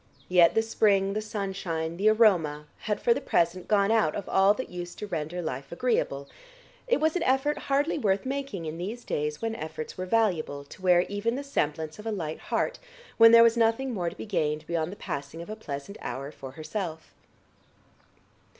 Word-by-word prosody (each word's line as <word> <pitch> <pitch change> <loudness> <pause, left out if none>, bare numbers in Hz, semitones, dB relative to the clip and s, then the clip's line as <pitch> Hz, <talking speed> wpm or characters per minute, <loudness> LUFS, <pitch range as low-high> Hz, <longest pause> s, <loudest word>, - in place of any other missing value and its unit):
Yet 175 -2 +5
the 225 - +3
spring, 200 -3 +2
the 215 - -1
sunshine, 190 -6 -3
the 205 +3 +4
aroma 175 -10 +3
had 210 -2 -2
for 235 - +4
the - - -4
present 170 +2 +1
gone 200 0 +3
out 220 -9 +2
of 200 - -5
all 195 +2 +4
that 260 - -6
used 175 0 -7
to - - -5
render 170 -1 -4
life 135 -2 -5
agreeable; 170 - -1 0.6
it - - +2
was 315 +2 +1
an 360 - 0
effort 270 0 +1
hardly 285 +3 +1
worth 200 -4 +1
making 270 -10 -3
in 160 +1 -5
these 215 +7 -5
days 150 +5 -2
when 225 0 -1
efforts 155 -4 -6
were 185 - -3
valuable, 180 -10 +1
to 140 - -14
wear 180 -1 +5
even 205 +5 -2
the 280 - -4
semblance 155 - -2
of 215 - -7
a - - 0
light 160 -7 -4
heart - - -2 0.4
when 230 0 +9
there 230 0 +9
was 230 0 +5
nothing 235 +3 +1
more 175 -5 -1
to - - -12
be - - -6
gained 155 -6 -1
beyond 165 0 -2
the - - -7
passing 140 -3 -6
of 170 +5 -7
a - - -4
pleasant 150 -1 -7
hour 140 +2 -5
for 135 -3 -10
herself. 160 +1 -5
195 Hz, 195 wpm, -27 LUFS, 160-225 Hz, 0.6 s, when